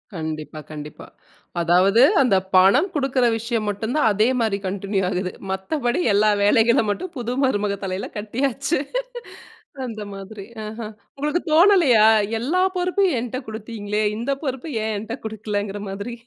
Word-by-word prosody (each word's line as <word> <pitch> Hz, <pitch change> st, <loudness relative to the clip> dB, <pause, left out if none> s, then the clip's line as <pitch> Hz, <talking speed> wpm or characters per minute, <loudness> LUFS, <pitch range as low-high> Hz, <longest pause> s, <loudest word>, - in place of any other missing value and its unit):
கண்டிப்பா, 155 Hz, -1 st, -5 dB
கண்டிப்பா. 150 Hz, 0 st, -9 dB, 0.6 s
அதாவது, 185 Hz, +6 st, +4 dB, 0.2 s
"அந்த 235 Hz, -7 st, +3 dB, 0.2 s
பணம் 195 Hz, -, +5 dB
குடுக்கிற 270 Hz, -3 st, +1 dB
விஷயம் 230 Hz, -1 st, -2 dB
மட்டும் 220 Hz, +4 st, -3 dB
தான் 300 Hz, -7 st, +3 dB
அதே 215 Hz, +2 st, +2 dB
மாரி 220 Hz, -3 st, +1 dB
கன்டின்யூ 195 Hz, +1 st, -2 dB
ஆகுது. 180 Hz, 0 st, -2 dB, 0.2 s
மத்தபடி 240 Hz, -, -1 dB
எல்லா 210 Hz, +1 st, +4 dB
வேலைகள 225 Hz, +4 st, +4 dB
மட்டும் 355 Hz, -, -5 dB
புது 240 Hz, 0 st, -3 dB
மருமக 205 Hz, -5 st, 0 dB
தலையில 190 Hz, 0 st, -3 dB
கட்டியாச்சு" 270 Hz, +7 st, -1 dB, 1.1 s
அந்த 215 Hz, -3 st, -6 dB
மாதிரி. 195 Hz, +1 st, -9 dB, 0.2 s
அஹ. 220 Hz, +2 st, -7 dB, 0.4 s
உங்களுக்கு 300 Hz, +5 st, -1 dB
தோணலையா, 325 Hz, -, +6 dB, 0.3 s
எல்லா 310 Hz, +11 st, 0 dB, 0.2 s
பொறுப்பையும் 360 Hz, -4 st, +1 dB
என்ட்ட 250 Hz, +1 st, -4 dB
குடுத்தீங்களே. 215 Hz, -1 st, -4 dB, 0.2 s
இந்த 245 Hz, +5 st, -2 dB
பொறுப்ப 265 Hz, -1 st, -3 dB, 0.2 s
ஏன் 220 Hz, -1 st, -1 dB
என்ட்ட 220 Hz, +2 st, -6 dB
குடுக்கலங்கிற 205 Hz, -2 st, -3 dB
மாதிரி. 200 Hz, +5 st, -5 dB
220 Hz, 135 wpm, -22 LUFS, 200-260 Hz, 1.1 s, தோணலையா